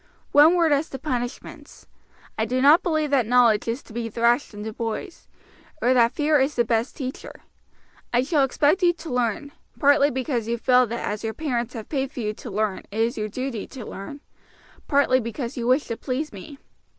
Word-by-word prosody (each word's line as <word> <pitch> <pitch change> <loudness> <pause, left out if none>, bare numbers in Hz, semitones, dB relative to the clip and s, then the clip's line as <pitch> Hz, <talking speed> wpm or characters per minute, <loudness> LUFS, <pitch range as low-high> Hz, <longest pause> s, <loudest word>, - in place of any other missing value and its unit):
"One 305 +4 +6
word 335 -3 +3
as 290 +2 +1
to 270 - -6
punishments. 250 -3 -6 0.5
I 220 - 0
do 250 +3 -1
not 290 +5 +6
believe 310 -4 -1
that 260 -6 +2
knowledge 235 -3 +4
is 235 +4 -3
to - - -15
be 230 0 -3
thrashed 235 +4 +1
into 215 +1 -7
boys, 230 - -5 0.5
or 250 -2 +3
that 235 -2 +4
fear 300 0 +2
is 270 +3 0
the 240 - +2
best 230 +1 -1
teacher. 260 -2 -7 0.7
I 245 +1 +2
shall 290 0 +2
expect 295 +7 +2
you 350 -1 +4
to 325 -5 -8
learn, 245 +3 -1 0.3
partly 285 0 +4
because 255 -4 -2
you 235 0 -1
feel 250 +1 +3
that 235 +2 -4
as 210 +1 -4
your 220 0 -3
parents 245 -6 -3
have 220 -2 -7
paid 270 -2 -2
for 265 - -8
you 210 -1 -2
to 235 - -10
learn 210 -1 -1
it - - -18
is 230 +3 +1
your 215 0 -3
duty 255 -1 -4
to 250 -5 -9
learn, 280 +9 -8 0.7
partly 280 -3 +3
because 235 +2 -5
you 240 -2 -3
wish 260 +4 +3
to 230 - -5
please 275 +3 -4
me. 205 +9 -10
250 Hz, 200 wpm, -24 LUFS, 230-285 Hz, 0.7 s, One